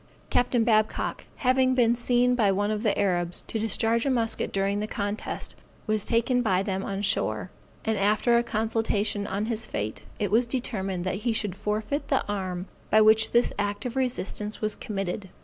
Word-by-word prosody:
Capt. 245 - +2 0.2
Babcock, 215 -2 +1
having 255 0 +2
been 235 -2 +4
seen 245 +1 +2
by 220 -5 +3
one 205 +2 0
of 210 -1 -2
the 215 -3 +1
Arabs 175 -3 0
to 225 - -3
discharge 225 +1 +1
a 275 - 0
musket 230 -3 0
during 195 +1 0
the 210 - -2
contest, 205 0 -4 0.3
was 215 -1 0
taken 235 +2 +2
by 190 -5 +2
them 190 -1 -2
on 195 0 -3
shore; - - 0 0.3
and 220 -1 0
after 215 +4 +3
a 235 - +5
consultation 220 -2 0
on 200 +3 -2
his 225 -1 -2
fate, 105 +1 -3 0.2
it 205 - -1
was 235 +3 +3
determined 195 -8 -2
that 185 0 -1
he 235 +1 0
should 210 -4 -1
forfeit 210 +8 -2
the 270 - +1
arm 185 -3 -3 0.2
by 215 - +5
which 220 +1 +5
this 240 +1 +2
act 205 +3 -2
of 250 0 -4
resistance 230 -5 -2
was 215 -1 0
committed. 195 -3 -4
215 Hz, 185 wpm, -26 LUFS, 200-235 Hz, 0.3 s, a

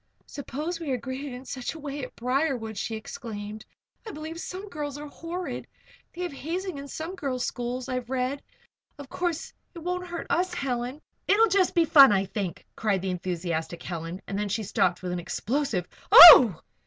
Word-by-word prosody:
"Suppose 305 +5 -5
we 325 -4 -5
are 255 - 0
greeted 260 +4 -6
in 265 - -7
any 255 +2 -10
such 260 +3 -5
way 290 -2 -6
at 250 - -8
Briarwood?" 250 -3 -1
she 225 +2 -3
exclaimed. 215 -2 -7 0.4
"I - - -4
believe 320 -2 -7
some 375 +4 -7
girls 295 -6 -5
are 295 - -7
horrid. 335 +5 -6 0.5
They 360 - -4
have 350 -4 -4
hazing 335 +3 -4
in 280 - -8
some 320 +5 -6
girls' 270 -8 -3
schools, 245 +1 -4
I've 255 -2 -4
read. 260 +2 -2 0.6
Of 285 -2 -10
course, 345 0 -3 0.2
it - - -7
won't 360 +1 -3
hurt 345 -1 -6
us, 360 +1 0
Helen 260 -1 -3
" - - -47
"It'll 435 +3 +5
be 430 - -5
just 375 -2 +2
fun, 275 -4 +9
I 195 -1 +2
think!" 190 -3 -5
cried 200 -4 -1
the 190 - -1
enthusiastic 170 -2 -4
Helen 170 +1 -5
and 200 0 -4
then 210 0 -2
she 220 +3 -2
stopped 185 -2 0
with 180 - -3
an 180 - -2
explosive 220 - -2 0.2
"Oh!" 250 - +11
265 Hz, 190 wpm, -26 LUFS, 215-320 Hz, 0.6 s, Oh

